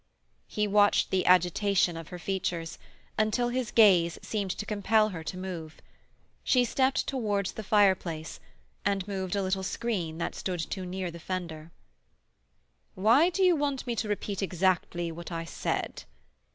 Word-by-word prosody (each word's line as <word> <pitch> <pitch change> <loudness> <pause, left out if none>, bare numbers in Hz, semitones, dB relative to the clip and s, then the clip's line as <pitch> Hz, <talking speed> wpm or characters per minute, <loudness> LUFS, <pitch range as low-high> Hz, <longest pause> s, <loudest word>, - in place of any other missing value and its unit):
He 210 0 -1
watched 205 0 +3
the 190 -1 +1
agitation 180 0 +3
of 165 -1 -7
her 180 - -8
features, 170 -2 -3 0.4
until 215 +3 +1
his 250 -2 -2
gaze 180 -7 +5
seemed 205 -3 -2
to 210 - -4
compel 215 +1 +2
her 165 -5 -6
to 180 - -5
move. 175 -4 -6 0.6
She 250 -2 +3
stepped 260 +2 +1
towards 210 -7 -1
the - - -7
fireplace, 190 -6 +1 0.4
and 195 -1 0
moved 190 -2 -3
a 200 - 0
little 190 0 -1
screen 185 -5 -3
that 170 - -3
stood 180 -2 -4
too 185 +3 -4
near 185 -1 -4
the 170 - -10
fender. 170 -3 -5 1.3
"Why 230 - +5
do 380 +2 0
you 360 -2 +5
want 285 -3 -1
me 240 -2 -2
to 215 - -2
repeat 205 -1 -3
exactly 180 -2 0
what 170 +2 -8
I 165 0 -4
said?" - - -3
190 Hz, 155 wpm, -28 LUFS, 175-215 Hz, 1.3 s, gaze